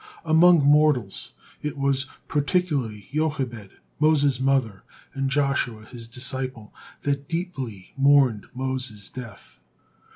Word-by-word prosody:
'" - - -22
Among 165 0 +6
mortals, 145 -8 +2 0.3
it 150 -1 -4
was 135 -1 0 0.2
particularly 145 - -1
Jochebed, 130 -9 -2 0.3
Moses' 145 -4 +3
mother, 130 -7 +1 0.3
and 135 0 -1
Joshua, 140 -6 0
his 115 0 -9
disciple, 130 -2 -4 0.3
that 140 0 -2
deeply 135 - -5
mourned 135 -6 +4
Moses' 130 -6 -3
death. 115 -5 -10
135 Hz, 105 wpm, -24 LUFS, 120-145 Hz, 0.3 s, Among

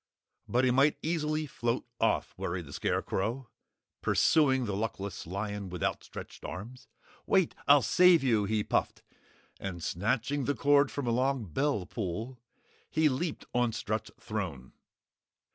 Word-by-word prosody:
"But 125 +2 +2
he 125 - +4
might 135 +4 +4
easily 155 -1 0
float 120 -3 -2
off," - - +1
worried 85 -1 -3
the 70 - -11
Scarecrow, 120 - -2 0.5
pursuing 135 -5 +3
the 100 -3 -2
luckless 100 -4 -4
lion 100 +1 -4
with 90 -2 -5
outstretched - - -4
arms. 110 +9 -8 0.4
"Wait 190 -4 +3
I'll 145 -1 +7
save 180 -4 +6
you!" 110 -6 +3
he 105 +1 0
puffed, - - -1 0.6
and 90 -4 -5
snatching 125 +8 0
the 145 - 0
cord 145 -1 +4
from 145 - -4
a 120 - +1
long 130 0 +1
bell 105 - 0
pull, 110 +6 -4 0.5
he 155 -1 +3
leaped 155 +4 -3
on 120 -2 +2
Strut's 110 +1 -3
throne. 90 - -5
120 Hz, 140 wpm, -30 LUFS, 100-140 Hz, 0.6 s, I'll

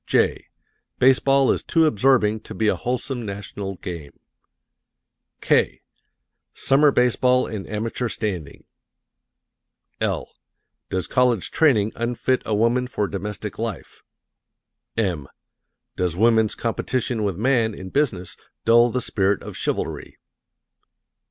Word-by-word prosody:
'" - - -50
(j) - - +1 0.5
"Baseball 135 +1 +4
is - - -1
too 165 -2 +2
Absorbing 110 -4 +3
to 110 0 -10
be 110 +3 0
a - - +3
Wholesome 125 0 -3
National 100 -1 -6
Game;" 85 -5 -8 1.2
(k) - - +1 0.7
"Summer 145 +2 +4
Baseball 125 0 +3
and 105 -4 -6
Amateur 115 +3 -2
Standing;" 90 -12 -4 1.4
(l) - - -1 0.6
"Does 95 -3 -2
College 125 -6 +1
Training 110 -10 +3
Unfit 120 +2 0
a 110 - +1
Woman 120 +4 +2
for 105 -5 -2
Domestic 105 +1 -5
Life?" 115 -5 -5 1.0
(m) 90 -10 -1 0.7
"Does 90 -2 -1
Woman's 110 0 +3
Competition 120 0 -2
with 100 -4 -1
Man 115 -2 +1
in 95 -1 -9
Business 110 -12 -1 0.3
Dull 120 +1 +6
the 125 +2 -1
Spirit 100 -3 0
of - - -8
Chivalry?" - - -3
110 Hz, 115 wpm, -23 LUFS, 100-125 Hz, 1.4 s, Dull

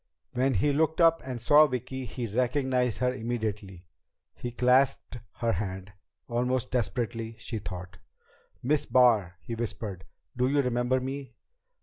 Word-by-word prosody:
When 130 +1 +1
he 140 +9 +2
looked 160 +3 +1
up 165 -1 +5
and 130 -2 -5
saw 150 +6 +6
Vicki, 130 0 -4
he 120 +1 -5
recognized 125 +1 0
her 125 0 +1
immediately. 110 -6 -4 0.5
He 120 - -5
clasped 125 0 +2
her 115 -1 0
hand, 95 -1 -4 0.3
almost 125 +1 -1
desperately, 115 -2 -2
she 115 -3 -5
thought. 90 -1 -8 0.6
"Miss 150 +3 +1
Barr!" 110 -9 +4
he 115 - -5
whispered. 105 -4 -4 0.3
"Do 125 +1 +2
you 140 +1 +2
remember 125 +1 +1
me?" 135 +1 -6
125 Hz, 135 wpm, -28 LUFS, 110-130 Hz, 0.6 s, saw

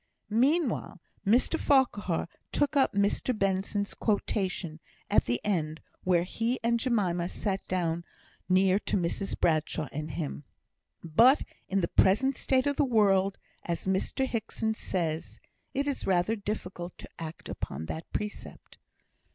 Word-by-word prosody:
Meanwhile, 260 - +1 0.3
Mr 245 +9 +3
Farquhar 225 - +2 0.2
took 290 +1 +1
up 270 -2 +4
Mr 205 +4 +1
Benson's 195 +1 0
quotation, 190 -6 -1 0.3
at 210 - +4
the 120 +1 0
end 160 -6 -1 0.2
where 175 -2 +3
he 230 +7 -1
and 235 0 +2
Jemima 185 -8 +1
sat 195 -2 -3 0.8
near 185 +1 +4
to - - -1
Mrs 185 +2 -2
Bradshaw 155 -1 +1
and 150 +2 -4
him. 145 -1 -4 0.6
"But 230 - +5 0.3
in 195 0 +2
the 170 - +1
present 255 +12 +3
state 260 -1 +2
of 285 -1 0
the - - +4
world, 200 -6 +3 0.3
as 170 -1 -3
Mr 190 +8 0
Hickson 225 -2 -2
says, 165 -6 -3 0.4
it 275 +1 +1
is 285 -2 -2
rather 190 +4 +2
difficult 190 -4 -5
to - - -10
act 165 -1 -7
upon 75 +4 -5
that 160 - -6
precept." 210 0 -6
195 Hz, 135 wpm, -29 LUFS, 175-230 Hz, 0.8 s, But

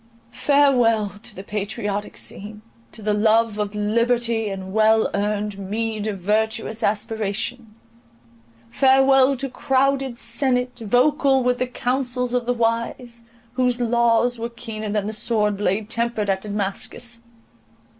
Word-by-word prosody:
Farewell 245 -8 +3
to - - -7
the 190 - -8
patriotic 205 0 -4
scene, 210 +2 -7 0.3
to 220 - -9
the 210 0 +1
love 220 +1 +2
of 210 0 -2
liberty 230 +1 +1
and 190 -1 -6
well 220 0 +3
earned 205 0 -2
meed 215 +2 -3
of 205 -2 -3
virtuous 220 +3 -1
aspiration!—farewell 220 - 0
to 275 +2 -3
crowded 270 0 0
senate, 250 +1 0
vocal 265 +4 +2
with 250 0 +1
the 255 - 0
councils 250 0 -1
of 245 -1 -1
the - - +2
wise, 235 +1 -2 0.3
whose 250 -1 +1
laws 235 0 +2
were 230 +1 -3
keener 225 -2 -6
than 205 -1 -1
the 215 - -3
sword 210 -1 +1
blade 205 +1 -1
tempered 230 -3 -1
at 190 0 -2
Damascus! 210 +3 -3
225 Hz, 125 wpm, -22 LUFS, 210-245 Hz, 0.3 s, Farewell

